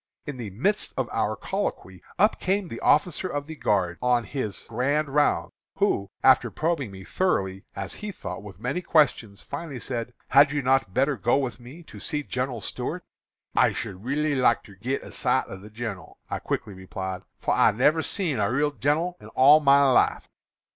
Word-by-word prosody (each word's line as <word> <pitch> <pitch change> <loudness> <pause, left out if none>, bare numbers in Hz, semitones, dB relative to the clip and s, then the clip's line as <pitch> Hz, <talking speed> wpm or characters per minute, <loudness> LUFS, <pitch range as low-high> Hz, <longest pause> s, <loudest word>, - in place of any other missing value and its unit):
In 145 -3 -5
the 115 -4 -5
midst 190 - -1
of - - 0
our - - 0
colloquy 95 -2 -4 0.2
up 210 +4 +3
came 190 0 0
the 115 - -6
officer 170 +4 +2
of 145 -5 -3
the 160 +1 -8
guard 95 - 0
on 125 -1 +2
his 110 -6 -4
'grand 140 +6 0
rounds,' 145 +1 +2 0.2
who, 100 -1 +1
after - - +5
probing 155 -6 -1
me 95 -1 -10
thoroughly, 95 - -1
as - - -4
he 210 -1 -5
thought, - - -7
with 100 -1 -11
many 140 +9 -2
questions, 125 - +2
finally 155 -6 -6
said, 120 -1 -4
'Had 140 +2 +6
you 145 -2 -1
not 130 -6 +2
better 135 +3 +2
go 120 +4 +2
with 130 -4 -2
me 130 +8 -12
to - - -12
see 150 -1 -2
General 125 -3 -3
Stuart?' - - -4 0.5
"'I - - +4
should 95 0 -6
reelly 145 +4 0
like 125 -3 +3
ter 100 - -14
git 125 +8 -3
a - - -10
sight - - +1
of 95 - -9
the 105 - -11
gin'ral,' 110 -5 -6
I - - -1
quickly 105 - -3
replied, 95 0 -6 0.2
'for - - 0
I - - +5
never 150 +8 +3
seen 160 - -2
a 100 +1 +1
reel 145 +3 +1
gin'ral 155 +6 0
in - - -12
all 145 +4 +6
my 140 -1 +5
life.' 130 - +3
130 Hz, 190 wpm, -26 LUFS, 105-150 Hz, 0.5 s, Had